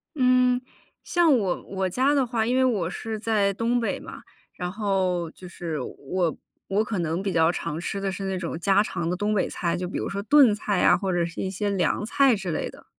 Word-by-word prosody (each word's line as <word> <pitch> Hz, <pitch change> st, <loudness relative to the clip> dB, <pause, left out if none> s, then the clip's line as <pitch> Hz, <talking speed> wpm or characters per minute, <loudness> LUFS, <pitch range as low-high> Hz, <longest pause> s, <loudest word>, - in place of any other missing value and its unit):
嗯， 250 Hz, -2 st, +3 dB, 0.4 s
像 340 Hz, -5 st, +3 dB
我 195 Hz, -7 st, 0 dB
我 190 Hz, -1 st, -2 dB
家 260 Hz, +9 st, +2 dB
的 275 Hz, -3 st, +3 dB
话， 230 Hz, -2 st, -1 dB
因 245 Hz, +2 st, +1 dB
为 260 Hz, -, +4 dB
我 210 Hz, -10 st, +1 dB
是 220 Hz, +3 st, -5 dB
在 210 Hz, -2 st, +1 dB
东 230 Hz, +4 st, 0 dB
北 230 Hz, -, -2 dB
嘛， -, -, -10 dB, 0.3 s
然 180 Hz, 0 st, -4 dB
后 190 Hz, -4 st, 0 dB
就 180 Hz, -, -12 dB
是 170 Hz, -3 st, -5 dB
我 165 Hz, +6 st, -2 dB, 0.3 s
我 200 Hz, +2 st, +1 dB
可 210 Hz, -3 st, -3 dB
能 170 Hz, +2 st, -1 dB
比 195 Hz, -2 st, -1 dB
较 165 Hz, 0 st, +4 dB
常 165 Hz, -3 st, -4 dB
吃 195 Hz, +3 st, -3 dB
的 195 Hz, 0 st, -2 dB
是 195 Hz, +1 st, -5 dB
那 190 Hz, -1 st, -2 dB
种 170 Hz, -3 st, -4 dB
家 195 Hz, +3 st, +3 dB
常 170 Hz, -5 st, -3 dB
的 180 Hz, -, 0 dB
东 205 Hz, +3 st, -1 dB
北 200 Hz, -, +1 dB
菜。 170 Hz, -1 st, -1 dB
就 180 Hz, 0 st, -3 dB
比 180 Hz, -, -4 dB
如 -, -, -2 dB
说 200 Hz, -, -3 dB
炖 265 Hz, 0 st, +6 dB
菜 205 Hz, -2 st, -1 dB
啊， -, -, +6 dB
或 195 Hz, -2 st, -2 dB
者 175 Hz, -1 st, +1 dB
是 170 Hz, -, -6 dB
一 190 Hz, -, -2 dB
些 200 Hz, +2 st, -2 dB
凉 190 Hz, +1 st, 0 dB
菜 270 Hz, +1 st, +4 dB
之 190 Hz, -4 st, -4 dB
类 -, -, -2 dB
的。 -, -, -15 dB
195 Hz, 250 characters per minute, -25 LUFS, 180-225 Hz, 0.4 s, 炖